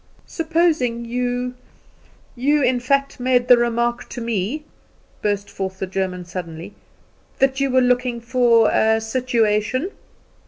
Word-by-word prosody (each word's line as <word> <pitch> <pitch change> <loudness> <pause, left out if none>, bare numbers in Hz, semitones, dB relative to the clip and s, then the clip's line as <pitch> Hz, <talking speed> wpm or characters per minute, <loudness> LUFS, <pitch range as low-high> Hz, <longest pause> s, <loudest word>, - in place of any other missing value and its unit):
"Supposing 315 -8 0
you 245 +1 -2 0.8
you, 285 +4 +2
in 250 -1 +2
fact, 275 +3 0
made 250 -1 +2
the 250 - +8
remark 240 0 -1
to - - -6
me," 230 +5 -2 0.6
burst 205 -1 -1
forth 190 -1 -5
the 190 - -3
German 185 -1 -3
suddenly, 175 +1 -7 0.6
"that 270 0 +2
you 275 0 +1
were 260 0 +3
looking 250 -1 +1
for 235 -2 +3
a 220 0 +3
situation." 230 - 0
240 Hz, 125 wpm, -21 LUFS, 215-255 Hz, 0.8 s, the